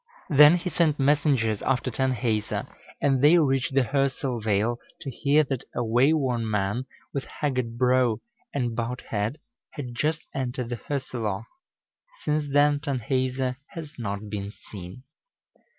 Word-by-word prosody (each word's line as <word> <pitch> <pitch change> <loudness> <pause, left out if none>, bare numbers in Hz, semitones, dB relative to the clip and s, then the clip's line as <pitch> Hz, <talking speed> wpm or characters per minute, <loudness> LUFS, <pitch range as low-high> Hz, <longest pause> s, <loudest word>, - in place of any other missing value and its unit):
Then 150 +4 +8
he 180 +1 -4
sent 155 -2 +2
messengers 135 -6 +2
after 130 -1 0
Tanhäuser, 115 -3 -1 0.3
and 135 -3 +2
they 155 +4 +7
reached 135 -4 +1
the 135 - +6
Hörsel 135 -2 -1
vale 110 +3 +1 0.2
to 135 - -5
hear 145 +5 +3
that 135 -3 -3
a 120 - 0
wayworn 125 0 +2
man, 105 +5 -1 0.3
with 140 - -2
haggard 125 -5 -2
brow 125 -2 +3 0.3
and 120 -5 -1
bowed 120 +2 -3
head, 110 +6 -1 0.4
had 130 -6 -6
just 155 +6 0
entered 125 -2 -3
the 120 - -3
Hörselloch. 115 -5 -3 0.8
Since 150 -1 0
then 145 +1 +4
Tanhäuser 130 -2 -1 0.2
has 155 -3 -7
not 100 -2 -4
been 100 -1 -4
seen. 100 +1 -10
130 Hz, 135 wpm, -26 LUFS, 115-145 Hz, 0.8 s, Then